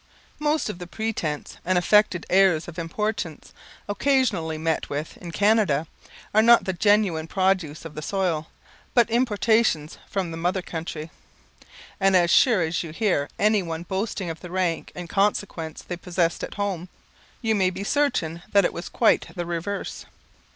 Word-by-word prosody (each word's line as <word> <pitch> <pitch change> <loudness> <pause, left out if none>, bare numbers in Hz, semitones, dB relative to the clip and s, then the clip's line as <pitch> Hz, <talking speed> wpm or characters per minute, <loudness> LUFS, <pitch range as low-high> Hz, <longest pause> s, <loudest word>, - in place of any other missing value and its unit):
Most 300 +1 +1
of 210 -4 -5
the 175 - -7
pretence, 175 -8 -3
and 185 +1 +1
affected 185 -1 +3
airs 185 -4 +4
of 175 0 -7
importance, 170 -1 -3 0.3
occasionally 205 - +1
met 160 0 -1
with 145 +2 -4
in 175 - -9
Canada, 200 -6 +2 0.5
are 215 - +6
not 235 +1 +6
the 190 - -1
genuine 195 -4 +2
produce 185 -5 0
of 160 - -7
the 155 - -6
soil, 170 -3 -1 0.5
but 240 -3 +5
importations 220 -8 +2
from 190 -4 -2
the 165 - -6
mother 180 +2 -1
country; 160 -2 -6 0.9
and, 195 -1 +4
as 175 -1 +4
sure 225 -9 +5
as 160 +1 -1
you 165 - -6
hear 165 -4 0
any 210 0 +3
one 165 -2 -5
boasting 190 -1 -3
of 160 - -8
the 180 - -9
rank 180 -2 -1
and 175 -1 -6
consequence 195 -4 -1
they 175 - -5
possessed 175 -1 -1
at - - -6
home, 190 -3 -3 0.5
you 225 -1 +2
may 190 -3 +3
be 190 +2 -5
certain 195 - 0
that 200 -2 +5
it - - 0
was 170 - -6
quite 230 - +3
the 175 -2 -3
reverse. 175 +4 -4
185 Hz, 165 wpm, -24 LUFS, 165-205 Hz, 0.9 s, are